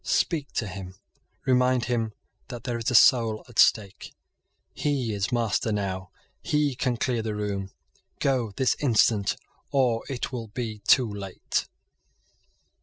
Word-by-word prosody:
Speak 150 -5 0
to 115 - -1
him. 95 -1 -7 0.5
Remind 125 -1 +3
him 115 -3 -1 0.3
that 120 -2 -8
there 120 -2 -2
is 115 - -1
a 125 - 0
soul 115 -2 +5
at 120 - -6
stake. 100 -3 +3 0.6
He 135 -7 -1
is 100 -1 -2
master 115 -2 0
now. 95 -3 -2 0.3
He 150 -2 +1
can 125 -1 -1
clear 120 -2 0
the 110 -1 -3
room. 100 -2 -3 0.5
Go 125 -6 0
this 130 - +2
instant, 110 -6 +3 0.3
or 125 -4 +2
it 130 -2 -3
will 120 -3 -5
be 110 0 -5
too 125 -3 +6
late." 100 -3 -3
115 Hz, 140 wpm, -26 LUFS, 105-125 Hz, 0.6 s, too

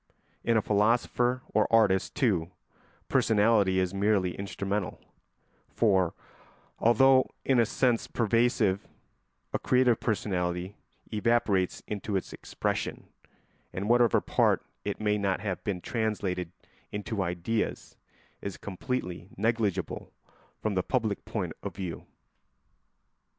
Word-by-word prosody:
In 115 -1 +3
a 110 - +2
philosopher 120 +4 +2
or 110 - +2
artist, 105 -4 +3
too, 90 -10 +1 0.6
personality 105 -3 +3
is 95 0 +1
merely 100 -2 +2
instrumental, 100 0 -3 0.7
for, 95 -6 +2 0.6
although 130 +3 +5 0.2
in 130 -2 +3
a 115 - +4
sense 120 -2 +1
pervasive, 115 -3 +1 0.7
a - - 0
creative 125 -2 +3
personality 90 -3 -1 0.4
evaporates 105 -4 +1
into 105 0 -3
its 95 - -2
expression, - - -3 0.6
and 100 +2 -4
whatever 120 -1 +4
part - - +2
of - - -35 0.2
it - - -3
may 105 -1 +1
not 100 -2 0
have 100 -4 -3
been 100 -4 -2
translated 100 -7 -2 0.4
into 105 0 -3
ideas 90 +5 -2 0.5
is 100 - -5
completely 95 -3 -4
negligible 105 -4 -1 0.5
from 110 - -1
the 95 - +1
public 110 -2 -1
point - - -3
of - - -6
view. 90 -4 -6
105 Hz, 115 wpm, -29 LUFS, 95-115 Hz, 0.7 s, although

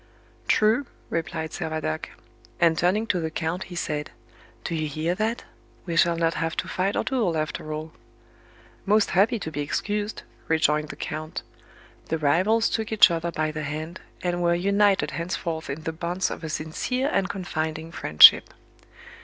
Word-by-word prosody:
"True," 225 +5 +3 0.2
replied 160 -1 -3
Servadac; 155 - -3 0.5
and 165 -1 +4
turning 185 +7 +1
to 185 -5 0
the 160 -1 -2
count 160 +3 -3
he 180 - -10
said, 150 -3 -3 0.5
"Do - - -3
you 155 -1 -1
hear 155 +4 -1
that? 220 +5 -2 0.4
We 170 -2 -3
shall 170 0 +3
not 165 0 +1
have 165 -1 -2
to - - -2
fight 190 +2 -1
our - - +1
duel 220 -11 0
after 155 0 -3
all." 155 +1 -5 0.9
"Most 210 +1 +2
happy 210 +6 +3
to 160 -6 -6
be 145 -1 -3
excused," 205 +8 -2 0.2
rejoined 150 -1 +2
the - - -7
count. 155 +1 -5 0.7
The 160 - 0
rivals 185 +10 +2
took 220 -1 -2
each 215 -4 +7
other 170 0 -1
by 155 -1 -1
the 155 0 -5
hand, 155 +4 -5 0.2
and 175 -1 -1
were 170 0 +3
united 200 +2 +2
henceforth 170 -2 -4
in 145 +3 -5
the 160 - -3
bonds 175 +3 -2
of - - -7
a 160 - -4
sincere 160 - -2
and 190 - +1
confiding 160 -3 -4
friendship. 75 - +7
170 Hz, 165 wpm, -25 LUFS, 155-195 Hz, 0.9 s, each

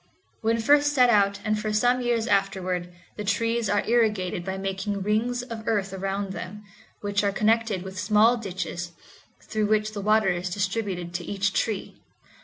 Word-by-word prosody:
When 225 +1 +2
first 290 +5 +4
set 250 -3 +5
out, 200 -2 +3
and 215 0 +1
for 215 0 -2
some 245 +4 +2
years 240 -2 +1
afterward, 190 -4 0 0.3
the 210 - -4
trees 230 +2 0
are 205 0 +1
irrigated 210 -7 +1
by 190 +1 -4
making 195 +1 -3
rings 235 +4 0
of 230 -3 -7
earth 200 -3 0
around 195 +1 -3
them, 210 +3 -7 0.4
which 205 0 0
are 200 - +2
connected 215 -2 +1
with 190 -1 -7
small 215 +4 +4
ditches, 180 -5 -5 0.5
through 215 -1 -1
which 215 0 +1
the 205 - -4
water 215 0 +3
is 180 0 -1
distributed 185 -2 -2
to 175 0 -3
each 200 +1 -1
tree. 215 -4 -2
205 Hz, 170 wpm, -25 LUFS, 190-225 Hz, 0.5 s, set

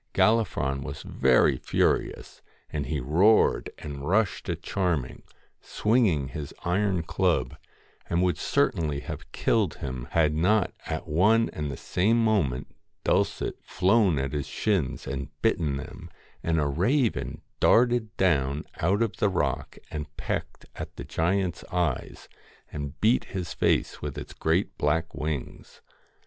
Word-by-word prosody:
Gallifron 105 -12 +2
was 70 +1 -6
very 65 -1 +3
furious, - - -1 0.3
and 75 -2 -2
he 75 -1 -1
roared, 90 - +3
and 70 -1 -6
rushed 105 -1 +1
at 85 -1 -3
Charming, 85 -10 -1 0.4
swinging 105 - +1
his 75 -2 -7
iron 95 -1 +1
club, - - 0 0.5
and 85 +1 +2
would 90 -4 +1
certainly 75 -3 +1
have - - -8
killed 105 -7 +1
him 65 -2 -5
had 80 -2 +2
not 90 +6 +2
at 80 0 -4
one 105 +9 +3
and 75 -1 -3
the 70 - -5
same 105 +6 +1
moment 100 - +1 0.3
Dulcet - - 0
flown 95 -3 +3
at 65 0 -2
his 75 -2 -2
shins 95 - -1
and 70 0 -4
bitten 75 -4 +1
them, - - -9 0.3
and 80 -1 +1
a 75 - +1
raven 110 - 0 0.2
darted 120 -2 +3
down 70 -6 +1
out 100 +7 +2
of 115 - -3
the 105 - +2
rock 70 -6 -2
and 75 -1 -6
pecked - - -4
at - - -7
the - - -6
giant's 90 +1 -1
eyes, 85 -7 -2 0.4
and 70 0 -6
beat 115 +4 +3
his 90 -4 -5
face - - +1
with 75 -2 -5
its - - -7
great - - 0
black 80 +2 0
wings. 75 -5 -5
80 Hz, 140 wpm, -27 LUFS, 70-100 Hz, 0.5 s, very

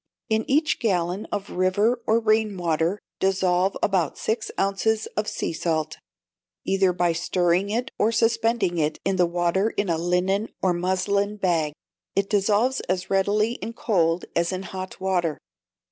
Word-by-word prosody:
In 220 0 0
each 300 +3 +2
gallon 185 -2 0
of 205 -1 -4
river 205 +7 +1
or 225 +1 +4
rain 215 -2 +1
water 170 +2 0 0.2
dissolve 190 0 +1
about 185 -6 +1
six 220 0 -2
ounces 215 +3 +1
of 210 0 -1
sea - - -2
salt, 160 -1 -2 0.7
either 190 -1 +3
by 175 -1 +1
stirring 175 +2 +1
it 245 +5 -2
or 220 - +3
suspending 225 -5 +1
it 155 0 0
in 195 0 +1
the 180 -1 +4
water 175 +4 +1
in 205 -3 -2
a 165 -1 +1
linen 180 +5 0
or 185 -2 +2
muslin 190 +3 0
bag. 165 -6 +1 0.4
It 195 +1 0
dissolves 210 +5 +2
as 185 +1 -1
readily 205 +3 +2
in 230 - -5
cold 175 -7 +1
as 170 +1 +1
in 185 0 -3
hot 185 0 -7
water. 180 -5 0
190 Hz, 155 wpm, -24 LUFS, 175-215 Hz, 0.7 s, or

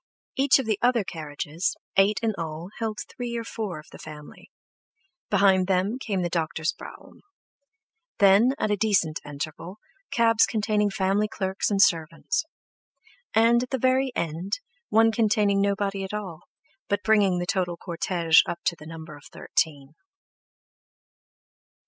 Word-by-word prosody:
Each 270 0 +4
of 265 - -2
the 215 -2 -1
other 240 -3 +3
carriages, 155 0 -4 0.2
eight 195 +2 +4
in 225 -1 +1
all, 165 +1 -6
held 220 -2 -2
three 240 -1 -5
or 230 - -3
four 215 -6 -5
of 155 - -11
the - - -12
family; 150 -1 -12 0.8
behind 190 -2 +4
them 195 +6 0
came 200 -7 -2
the - - 0
doctor's 160 -1 -1
brougham; - - -13 1.0
then, 205 +6 +5
at 215 - -1
a - - +3
decent 195 -7 +1
interval, 155 +6 -7 0.3
cabs 230 -1 +3
containing 210 -2 0
family 195 +2 +1
clerks 190 -2 -2
and 200 -2 0
servants; 165 - 0 0.9
and 230 +2 +5
at 250 - -5
the 265 - -1
very 260 +1 +2
end, 170 +4 -3 0.4
one 225 +1 +4
containing 210 -3 +2
nobody 200 0 -1
at 190 +2 -5
all, 185 -7 -7 0.4
but 205 0 0
bringing 205 -4 +3
the 175 - -2
total 175 -2 -1
cortege 170 -2 +2
up 170 - -3
to 170 - +1
the 150 -1 -13
number 160 -1 -9
of 145 - -16
thirteen. 145 -3 -2
195 Hz, 145 wpm, -25 LUFS, 165-220 Hz, 1.0 s, then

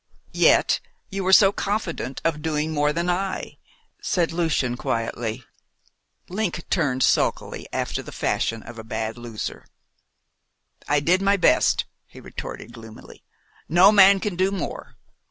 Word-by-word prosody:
"Yet - - +4 0.3
you 195 0 -3
were 190 - +1
so 195 0 +7
confident 195 - -3
of 155 -2 0
doing 155 0 -1
more 150 -1 +1
than 170 +3 -2
I," 190 +2 -2 0.4
said 175 -3 0
Lucian 160 -7 0
quietly. 115 0 -3 0.8
Link 180 -3 -3
turned 140 -7 +1
sulkily, - - 0
after - - -2
the - - -10
fashion 115 -1 -1
of 115 0 -10
a - - -7
bad 110 0 -4
loser. 120 -3 -6 1.2
"I 145 0 +2
did 180 +6 +2
my 200 +1 +3
best," 180 - +3 0.2
he - - -14
retorted 120 - -8
gloomily. 110 -2 -13 0.5
"No 180 +5 +6
man 200 -1 +7
can 205 -2 -3
do 185 +2 +2
more. 195 -1 -5
165 Hz, 135 wpm, -23 LUFS, 120-190 Hz, 1.2 s, so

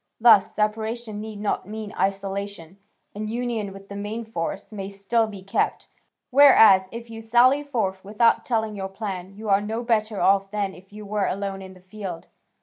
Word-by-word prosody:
Thus 225 -4 +6
separation 220 +1 -2
need 215 -1 -7
not 205 -3 -2
mean 215 0 -6
isolation, 195 -2 -3 0.3
and 215 +1 -5
union 230 -3 -2
with 195 0 -12
the 200 - -8
main 210 +3 -4
force 175 -3 -4
may 195 -2 -5
still 200 +3 0
be 200 -3 -9
kept, 195 - -1 0.4
whereas 220 -9 +7
if 230 0 -8
you 225 0 -7
sally 245 +5 +4
forth 220 -10 -2
without 215 +4 +2
telling 220 -3 -1
your 195 -1 -4
plan, 195 -2 -6
you 215 +1 -8
are 200 0 +4
no 220 +3 -3
better 220 -3 0
off 195 0 +3
than 200 -2 -2
if 190 +2 -16
you 210 0 -9
were 205 -1 -1
alone 195 0 -3
in 190 0 -10
the 185 - -17
field. 185 -3 -8
210 Hz, 180 wpm, -24 LUFS, 195-225 Hz, 0.4 s, whereas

